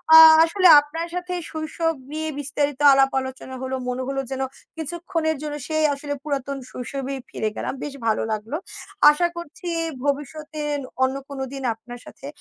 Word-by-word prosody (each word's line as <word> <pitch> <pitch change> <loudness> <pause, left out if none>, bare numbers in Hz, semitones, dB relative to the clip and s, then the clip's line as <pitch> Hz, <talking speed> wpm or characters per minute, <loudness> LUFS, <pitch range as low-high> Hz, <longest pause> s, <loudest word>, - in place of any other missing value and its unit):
আ - - +13 0.3
আসলে 365 +3 +4
আপনার 325 +4 -4
সাথে 360 0 -3 0.2
শৈশব 320 +1 -1 0.2
নিয়ে 315 0 -3
বিস্তারিত 290 -1 -1
আলাপ 270 0 +4
আলোচনা 260 0 -7
হলো। 260 0 -2
মনে 255 +1 -2
হলো 270 0 -1
যেন 265 - -2 0.4
কিছুক্ষণের 325 0 -2
জন্য 300 -1 -4
সেই 310 -1 0
আসলে 285 +1 -4
পুরাতন 280 -2 -3
শৈশবেই 270 +2 -5
ফিরে 215 - -2
গেলাম। - - -3
বেশ 290 - -5
ভালো 215 - +2
লাগলো। 220 +8 -3 0.5
আশা 345 +4 +1
করছি 340 +1 -8 0.4
ভবিষ্যতে 300 +2 -3 0.4
অন্য 260 +1 +1
কোনো 270 -1 -4
দিন 270 - -6
আপনার 240 +2 -11
সাথে 275 - -11
290 Hz, 155 wpm, -23 LUFS, 265-315 Hz, 0.5 s, আ